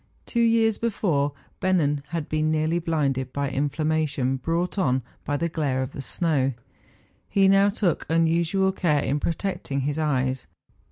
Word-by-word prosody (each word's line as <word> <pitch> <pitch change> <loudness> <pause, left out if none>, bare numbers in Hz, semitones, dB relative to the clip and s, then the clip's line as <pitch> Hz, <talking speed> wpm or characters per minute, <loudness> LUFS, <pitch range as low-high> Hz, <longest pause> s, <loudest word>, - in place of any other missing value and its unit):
Two 235 - 0
years 225 -2 +3
before 175 -11 0 0.3
Bennen 160 -7 +2
had 165 -2 -4
been 155 0 0
nearly 155 +2 +1
blinded 140 -6 -1
by 140 0 -2
inflammation, 145 -1 0
brought 170 +7 -1
on 130 -7 +1 0.2
by 145 - 0
the 170 - 0
glare 145 -5 -1
of 130 - -6
the - - -6
snow, 155 +1 0
and 135 - 0 0.8
he 195 -1 +4
now 195 +1 +5
took 195 -5 -1
unusual 165 +4 +2
care 155 -7 +1
in 145 +2 0
protecting 165 -4 -2
his 145 +3 -2
eyes. 130 -4 0
155 Hz, 155 wpm, -25 LUFS, 140-180 Hz, 0.8 s, now